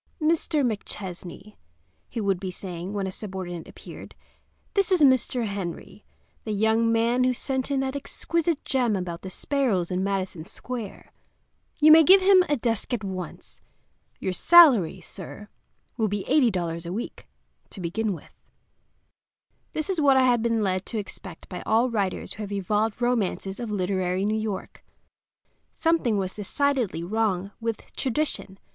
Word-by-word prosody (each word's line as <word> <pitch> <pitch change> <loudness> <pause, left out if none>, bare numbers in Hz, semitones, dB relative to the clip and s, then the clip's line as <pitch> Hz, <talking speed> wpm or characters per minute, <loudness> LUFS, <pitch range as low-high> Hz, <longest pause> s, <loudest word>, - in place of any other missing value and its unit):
"Mr. 310 -2 +1
McChesney," 200 -2 -5 0.5
he 235 - -4
would 195 -4 0
be 190 - -4
saying 180 0 -6
when 200 -2 -2
a 190 - -3
subordinate 185 -4 -6
appeared, - - -11 0.6
"this 395 -2 +1
is 365 -3 +3
Mr. 260 -3 +3
Henry, 200 0 -6 0.4
the 215 - -3
young 220 +2 +2
man 235 +2 +2
who 255 0 +2
sent 265 +1 -2
in 275 -1 +1
that 265 +1 -2
exquisite 330 +3 -2
gem 245 -5 +1
about 180 -2 -4
the 190 - -7
sparrows 210 -6 0
in 185 +1 0
Madison 190 -4 -2
Square. 230 +3 -7 0.7
You 310 +1 +7
may 320 +1 +10
give 380 +5 +8
him 380 -1 +6
a 290 - +2
desk 230 0 -1
at 215 - -7
once. 185 -2 -7 0.6
Your 190 - -2
salary, 235 - +6
sir, 200 +4 -9 0.5
will 220 -2 +2
be 205 -1 -2
$80 180 - +1
a - - -4
week, 220 +6 -6 0.4
to - - -10
begin 200 +5 -1
with." 170 - -12 1.4
This 310 - -2
was 375 -5 0
what 275 -2 +5
I 260 - +5
had 245 -2 +3
been 230 -1 +1
led 185 -1 0
to 230 - -4
expect 190 -4 -7
by 180 - -6
all 235 +3 +2
writers 200 -4 -2
who 215 - -8
have 205 -1 -5
evolved 210 +4 -1
romances 205 -5 -1
of 235 -2 -4
literary 185 -1 0
New 210 - +1
York. 215 -3 -5 0.9
Something 325 -10 +2
was 190 -1 -2
decidedly 225 - -1
wrong 200 -1 -1
with 230 -2 -4
tradition. 260 -7 -2
215 Hz, 155 wpm, -25 LUFS, 190-255 Hz, 1.4 s, may